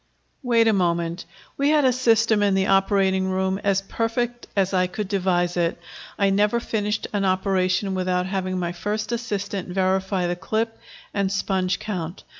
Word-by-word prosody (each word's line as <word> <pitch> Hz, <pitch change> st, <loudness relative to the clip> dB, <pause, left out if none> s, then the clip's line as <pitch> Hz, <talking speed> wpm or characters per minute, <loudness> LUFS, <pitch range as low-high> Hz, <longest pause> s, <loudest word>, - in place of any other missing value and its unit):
"Wait 235 Hz, -3 st, +3 dB
a 220 Hz, -, +4 dB
moment. 170 Hz, -2 st, 0 dB, 0.3 s
We 280 Hz, +1 st, +2 dB
had 300 Hz, -2 st, +4 dB
a 255 Hz, -, +4 dB
system 230 Hz, -3 st, +3 dB
in 200 Hz, -1 st, +3 dB
the 190 Hz, 0 st, +2 dB
operating 195 Hz, -1 st, +2 dB
room 190 Hz, +1 st, 0 dB
as 195 Hz, -1 st, +1 dB
perfect 240 Hz, +3 st, -2 dB
as 195 Hz, -1 st, +1 dB
I 185 Hz, -1 st, +2 dB
could 200 Hz, +3 st, -4 dB
devise 180 Hz, -3 st, 0 dB
it. 170 Hz, -1 st, 0 dB, 0.4 s
I 200 Hz, -1 st, +2 dB
never 210 Hz, +4 st, +2 dB
finished 210 Hz, -2 st, -2 dB
an 205 Hz, -1 st, 0 dB
operation 190 Hz, 0 st, +1 dB
without 185 Hz, -1 st, 0 dB
having 185 Hz, -1 st, -2 dB
my 175 Hz, -1 st, -2 dB
first 210 Hz, +5 st, -3 dB
assistant 205 Hz, -5 st, -3 dB
verify 190 Hz, 0 st, 0 dB
the 175 Hz, 0 st, -1 dB
clip 220 Hz, +5 st, -2 dB, 0.3 s
and 200 Hz, -1 st, 0 dB
sponge 190 Hz, -2 st, 0 dB
count. 185 Hz, -5 st, -5 dB
195 Hz, 165 wpm, -23 LUFS, 185-215 Hz, 0.4 s, a